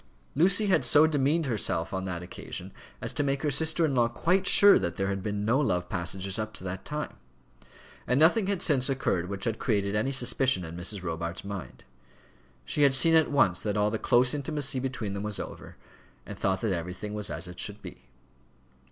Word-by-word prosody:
Lucy 190 +8 +4
had 190 -9 +2
so 145 +5 +6
demeaned 155 +1 +1
herself 105 -9 -2
on 95 0 -3
that 90 -2 -5
occasion 90 - -9 0.3
as - - -3
to - - 0
make 140 0 -1
her 150 - 0
sister 160 +3 +3
in 145 - -1
law 120 -2 +3
quite 180 +10 0
sure 205 -1 +7
that 85 0 -3
there 95 0 -2
had 100 -1 -3
been 105 +1 -3
no 120 +5 +2
love 90 -11 -1
passages 95 +2 -2
up 110 0 -5
to - - -8
that 95 0 -6
time; 150 0 -6 0.9
and 125 - +2
nothing 185 +6 +4
had 200 -3 0
since 135 -4 +3
occurred 95 -10 -1
which 100 -1 -5
had 115 -1 -2
created 100 -3 -1
any 110 +6 0
suspicion 130 -5 +1
in 80 +1 -8
Mrs. 95 +2 -3
Robarts' 85 +2 -5
mind. 100 -2 -8 0.8
She 150 - -2
had 140 -2 +5
seen 165 +4 +6
at 160 -1 +4
once 95 -11 +2
that 105 -1 -2
all 105 0 +1
the 110 - -2
close 125 +1 +2
intimacy 145 -2 -1
between 125 -6 -4
them 100 - -4
was 105 -1 -4
over, - - -9 0.5
and - - -8
thought 95 -1 -1
that 110 -4 0
everything 90 +5 -5
was 105 -2 -4
as 80 +5 -6
it 90 0 -11
should 105 +1 -4
be. - - -11
110 Hz, 205 wpm, -27 LUFS, 95-145 Hz, 0.9 s, sure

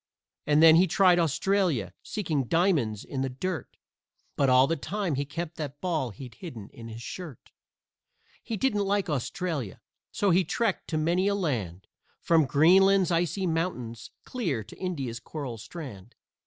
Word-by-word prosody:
And 150 +1 +4
then 160 0 +9
he 185 +2 +5
tried 180 0 +4
Australia, 165 - +1
seeking 160 - -2
diamonds 150 - +1
in 135 - -4
the 135 - -1
dirt, 160 +3 -5 0.6
But 140 -2 +2
all 130 +1 +6
the 165 - 0
time 180 +3 -2
he 140 +1 -1
kept 165 +3 -6
that 145 -2 -5
ball 160 -8 -1
he'd 120 +3 -10
hidden 115 - -9
in 115 -1 -10
his 115 +1 -8
shirt. 155 - -8 0.9
He 225 - -4
didn't 210 -4 +1
like 195 -3 0
Australia, 145 - -3 0.3
so 200 -2 +1
he 185 +2 +4
trekked 225 +1 -1
to 155 - -2
many 170 +5 +1
a 200 - +2
land, 110 - -2 0.3
From 165 -3 +3
Greenland's 185 +6 +5
icy 175 +3 0
mountains 160 - -3 0.2
clear 170 - -2
to - - -14
India's 135 -11 -3
coral 125 -2 -6
strand. 120 - -9
160 Hz, 155 wpm, -27 LUFS, 130-185 Hz, 0.9 s, then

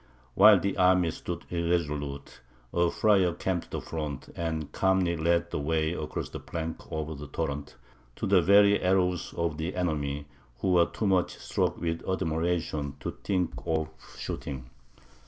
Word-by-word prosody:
While 105 - +8
the 100 +2 -1
army 90 -2 +4
stood - - -6
irresolute, 75 -6 -2 0.3
a 85 0 +3
friar 95 -4 +3
came 90 -1 -1
to - - -16
the - - -4
front, 75 -4 -5
and 80 -3 -3
calmly 95 -2 +2
led 85 +1 +1
the - - -1
way 80 +2 0
across 75 -3 -4
the - - -6
plank 80 -1 -6
over 80 0 -3
the 75 0 -8
torrent, 75 -1 -4 0.4
to - - -3
the 95 -2 +5
very 100 +3 +6
arrows 90 -1 +1
of 85 -2 -1
the 80 +3 -3
enemy, 75 -5 -1 0.4
who 95 - +1
were 85 -2 +5
too 110 - -4
much 95 -2 +2
struck - - -1
with 85 -1 -2
admiration 80 -4 -1
to - - -3
think 90 -4 0
of 80 -1 0 0.3
shooting. 65 -2 -5
85 Hz, 155 wpm, -28 LUFS, 75-90 Hz, 0.4 s, While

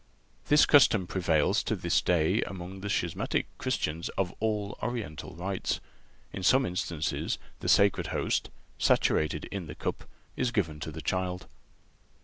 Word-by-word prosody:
This 150 0 +6
custom 115 -9 +5
prevails 85 -5 +2
to - - -1
this - - +1
day 90 +4 +2
among 95 0 -6
the 100 - -4
schismatic 85 -4 0
Christians 80 +2 -1
of 95 -2 0
all 105 -2 -1
Oriental 110 -11 -4
rites. 95 +3 -2 0.5
In 95 - -5
some 130 +7 +4
instances 85 -3 -2 0.2
the - - -3
Sacred 100 -1 +4
Host, - - -1 0.3
saturated 75 -1 +2
in 95 -4 -4
the 75 - -7
cup, - - -4 0.3
is 125 - 0
given 80 -10 -1
to 80 - -5
the 80 +1 -8
child. 90 0 -2
90 Hz, 140 wpm, -29 LUFS, 80-100 Hz, 0.5 s, This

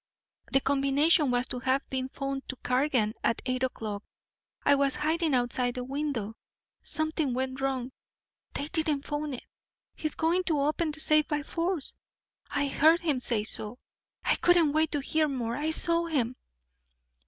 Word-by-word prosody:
The 270 - +4
combination 280 +3 +3
was 245 0 +1
to 250 - -3
have 260 +2 0
been 260 0 -2
phoned 275 0 -4
to 260 - -3
Cargan 250 -4 +1
at 230 - +1
eight 255 -1 -1
o'clock. 215 -5 -3 0.6
I - - +5
was 280 -1 +2
hiding 315 -1 +1
outside 245 0 0
the 250 - -3
window. 265 -5 -3 0.5
Something 315 -4 +1
went 260 +1 -2
wrong 265 -2 -1 0.6
they 285 - -1
didn't 305 -3 0
phone 295 -2 -3
it. - - -10 0.5
He's 310 - -2
going 335 +3 +2
to 310 -4 +1
open 305 +3 +1
the 305 +1 -3
safe 305 -1 +4
by 295 -1 -1
force. 335 -1 -2 0.6
I 285 - 0
heard 315 +4 +4
him 300 -6 +1
say 230 -4 0
so. 215 +2 -3 0.5
I - - +3
couldn't 345 -4 +4
wait 315 0 +2
to 290 - +1
hear 310 +3 +1
more 240 -5 -2
I 300 +4 -1
saw 335 +1 +1
him." 255 -6 0
280 Hz, 165 wpm, -29 LUFS, 255-310 Hz, 0.6 s, I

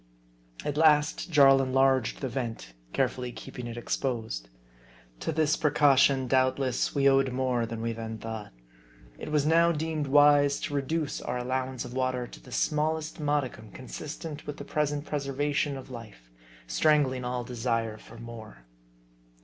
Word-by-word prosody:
At 150 0 -2
last, 150 +1 +3
Jarl 135 -4 +6
enlarged 130 -2 +2
the 135 - -1
vent, 115 - -5 0.2
carefully 125 - -1
keeping 120 0 -8
it 120 0 -7
exposed. 115 - -3 0.7
To - - -2
this 155 -1 +2
precaution, 140 -3 +4
doubt 130 +1 +3
less, 130 -1 -1
we 140 -1 +4
owed 135 -1 +4
more 125 -2 0
than 115 0 -5
we 115 0 -1
then 110 0 -6
thought. 110 -2 -7 0.7
It - - -6
was 150 -2 +2
now 170 +2 +4
deemed 155 -2 -2
wise 145 0 +5
to - - -4
reduce 145 +2 -1
our 125 - -3
allowance 130 +1 -2
of 120 - -8
water 130 -1 -1
to - - -12
the - - -15
small 155 +1 +1
est 160 0 -8
modicum 140 -7 -1
consistent 150 +6 -8
with 145 - -5
the - - -8
present 145 -1 -1
preservation 145 0 -1
of 130 0 -10
life; 105 - -11 0.3
strangling 130 - +2
all 125 0 -2
desire 115 -2 -2
for - - -14
more. 110 - -10
130 Hz, 155 wpm, -28 LUFS, 120-145 Hz, 0.7 s, Jarl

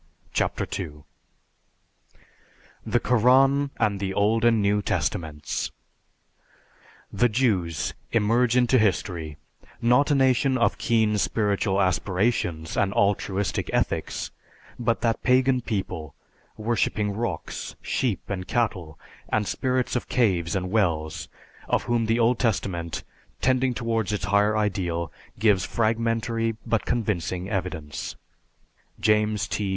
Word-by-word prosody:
CHAPTER - - 0 0.2
II 75 -5 -7 1.8
THE 115 +2 +1
KORAN 135 +4 +4
AND 105 -3 +1
THE 95 -1 -3
OLD 110 +3 +2
AND 115 -2 +4
NEW 105 0 +2
TESTAMENTS 80 -6 -2 1.5
_The 120 +5 +3
Jews 100 - 0 0.2
emerge 115 +2 +3
into 125 +1 +4
history, 90 -7 -1 0.4
not 125 +5 +3
a 145 - +3
nation 130 0 +3
of 115 - +1
keen 110 -2 +2
spiritual 100 -2 +1
aspirations 95 -3 0
and 100 -1 +1
altruistic 100 -2 0
ethics, - - -1 0.5
but 115 -1 0
that 115 -1 0
pagan 130 0 +3
people, 95 - -4 0.4
worshipping 110 -2 0
rocks, 100 -5 -4
sheep 120 -7 -1
and 90 -2 -4
cattle, 95 -10 -1 0.3
and 110 -1 +1
spirits 130 -1 0
of 125 - -2
caves 90 -9 +1
and 95 -1 -2
wells, 80 -8 0 0.4
of - - +2
whom 120 -2 0
the 115 +1 +2
Old 120 +1 +3
Testament, 95 -8 -1 0.4
tending 130 0 +2
towards 115 -4 -1
its 105 -3 -2
higher 105 +2 +3
ideal, 90 -6 -1 0.3
gives 100 -4 +3
fragmentary 115 0 0
but 115 - 0
convincing 95 -5 -1
evidence_. 85 - -4 0.8
JAMES 105 -1 +2
T. 100 -2 -2
105 Hz, 115 wpm, -25 LUFS, 95-120 Hz, 1.8 s, KORAN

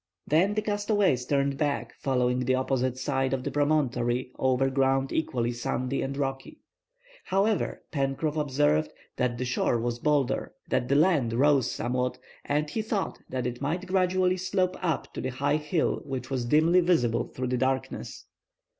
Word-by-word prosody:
Then 185 +7 +2
the 215 - 0
castaways 205 - +1
turned 140 -1 +1
back, 145 -2 -1
following 125 -2 +1
the 130 +1 +1
opposite 130 -1 0
side 135 0 0
of 130 -1 -1
the - - -3
promontory 130 -4 +1
over 130 0 +2
ground 135 0 +1
equally 120 -6 0
sandy 125 +2 -2
and 135 +1 -3
rocky. 135 -1 -3 0.7
However, 200 +2 0
Pencroff 140 +2 -1
observed 80 - +1 0.3
that 125 -1 0
the 130 - -2
shore 120 -1 +1
was 120 +1 -2
bolder, 145 -2 0 0.2
that 125 - +1
the 140 - +2
land 150 -7 +3
rose 135 0 +3
somewhat, 125 +2 -1 0.3
and 150 +1 0
he 220 +9 -2
thought 215 -2 -2
that 130 -2 -3
it 125 0 -4
might 165 +6 -2
gradually 185 0 +2
slope 185 0 0
up 165 -6 -2
to - - -4
the 130 - -2
high 140 +4 0
hill 150 +2 0
which 135 -1 -5
was 130 -3 -1
dimly 160 +7 +4
visible 140 -10 +2
through 130 -1 -4
the 125 - 0
darkness. 130 +1 -2
135 Hz, 165 wpm, -27 LUFS, 125-155 Hz, 0.7 s, dimly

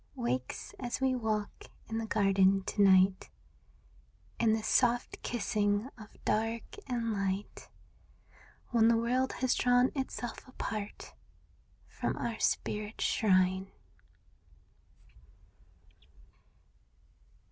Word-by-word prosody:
Wakes 125 +2 -3
as 245 0 -3
we 265 -1 +2
walk 220 -4 -2 0.2
in 225 0 -3
the 225 - -4
garden 195 -2 +3
to 205 - -1
night. 190 -1 +4 1.1
In 225 -2 +3
this 220 -1 -1
soft 245 -1 +1
kissing 210 0 0
of 215 -3 -11 0.2
dark 225 +1 0 0.2
and 235 -3 -1
light. 195 0 -3 1.0
When 230 -2 +4
the 230 0 +4
world 250 +3 0
has 255 -1 +1
drawn 245 +1 +3
itself 260 -3 -5
apart 215 -5 -6 0.7
From - - -3
our 230 -2 -3
spirit's 210 +1 -1
shrine. 185 -2 +2
220 Hz, 95 wpm, -31 LUFS, 195-240 Hz, 1.1 s, night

